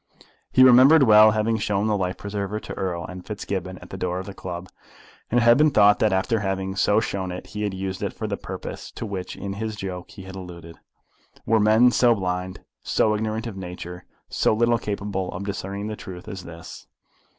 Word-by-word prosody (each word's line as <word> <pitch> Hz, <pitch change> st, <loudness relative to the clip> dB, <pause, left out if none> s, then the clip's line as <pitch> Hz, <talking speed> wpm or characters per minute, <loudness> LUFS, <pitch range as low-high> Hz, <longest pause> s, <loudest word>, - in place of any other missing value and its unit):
He 130 Hz, -, +6 dB
remembered 130 Hz, +4 st, +8 dB
well 110 Hz, -2 st, +8 dB
having 110 Hz, +1 st, +1 dB
shown 105 Hz, -1 st, 0 dB
the 110 Hz, -1 st, +1 dB
life 95 Hz, -2 st, -2 dB
preserver 100 Hz, 0 st, -4 dB
to -, -, -8 dB
Erle 90 Hz, -3 st, -3 dB
and 90 Hz, 0 st, -9 dB
Fitzgibbon 95 Hz, -3 st, -5 dB
at -, -, -14 dB
the 95 Hz, -, -7 dB
door 90 Hz, -1 st, -1 dB
of 95 Hz, -, -5 dB
the 100 Hz, -, -8 dB
club; 90 Hz, -2 st, -6 dB, 0.6 s
and 120 Hz, -, +3 dB
it -, -, +2 dB
had 120 Hz, +3 st, +6 dB
been 155 Hz, 0 st, +6 dB
thought 105 Hz, -6 st, +5 dB
that 110 Hz, -, +3 dB
after 95 Hz, +5 st, +1 dB
having 95 Hz, -1 st, -2 dB
so 105 Hz, +2 st, +3 dB
shown 95 Hz, -4 st, -3 dB
it 90 Hz, -, -7 dB
he 105 Hz, +2 st, -7 dB
had 100 Hz, -2 st, -2 dB
used 95 Hz, 0 st, -4 dB
it -, -, -2 dB
for -, -, -6 dB
the -, -, -2 dB
purpose -, -, -7 dB
to -, -, -6 dB
which 95 Hz, -3 st, -5 dB
in 100 Hz, 0 st, -5 dB
his 110 Hz, +1 st, -4 dB
joke 95 Hz, -3 st, -6 dB
he 95 Hz, -, -11 dB
had 95 Hz, 0 st, -9 dB
alluded! 85 Hz, -3 st, -10 dB, 0.7 s
Were 110 Hz, 0 st, +3 dB
men 110 Hz, +4 st, +5 dB
so 120 Hz, -1 st, +4 dB
blind, 90 Hz, -1 st, -3 dB, 0.2 s
so 110 Hz, -, +1 dB
ignorant 110 Hz, +2 st, -2 dB
of 115 Hz, -4 st, -6 dB
nature, 90 Hz, -1 st, -7 dB, 0.2 s
so -, -, +1 dB
little 120 Hz, +1 st, +2 dB
capable 100 Hz, -3 st, -3 dB
of 90 Hz, -, -5 dB
discerning 100 Hz, 0 st, -4 dB
the 110 Hz, 0 st, -4 dB
truth 90 Hz, -1 st, -10 dB
as 95 Hz, -4 st, -7 dB
this? 85 Hz, -1 st, -11 dB
100 Hz, 210 wpm, -24 LUFS, 95-110 Hz, 0.7 s, remembered